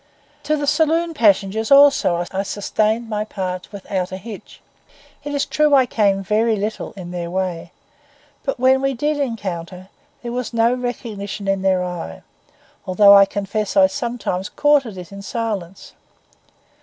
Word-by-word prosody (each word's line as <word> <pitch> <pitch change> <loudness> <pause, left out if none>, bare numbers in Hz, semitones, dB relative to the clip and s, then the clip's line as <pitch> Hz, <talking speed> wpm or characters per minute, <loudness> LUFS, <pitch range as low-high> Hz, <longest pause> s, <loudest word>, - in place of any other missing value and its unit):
To 305 +1 +1
the 290 - -2
saloon 320 +3 +1
passengers 215 -3 +2
also 275 -11 +5
I 195 - -1
sustained 215 +3 -1
my 210 -1 -2
part 185 -4 -5
without 190 -2 -4
a 185 - -4
hitch. 210 +1 -10 0.6
It 290 - -5
is 285 - 0
true 300 -1 +3
I 265 -2 +5
came 200 -4 +1
little 215 -1 0
in 180 -3 -9
their 175 -1 -4
way; 180 -2 -3 0.7
but 270 -3 -3
when 260 +1 +4
we 275 -1 0
did 295 +5 -1
encounter, 190 -7 -4 0.3
there 240 - -4
was 245 0 -4
no 230 +1 +3
recognition 220 -5 -5
in 195 -1 0
their 190 -1 +2
eye, 175 - -6 0.6
although 200 +2 +6
I 200 0 +8
confess 205 +1 -3
I 190 - +7
sometimes 195 -2 -3
courted 280 -9 +2
it 180 0 -9
in 200 0 -9
silence. 200 -4 -5
210 Hz, 150 wpm, -20 LUFS, 190-245 Hz, 0.7 s, I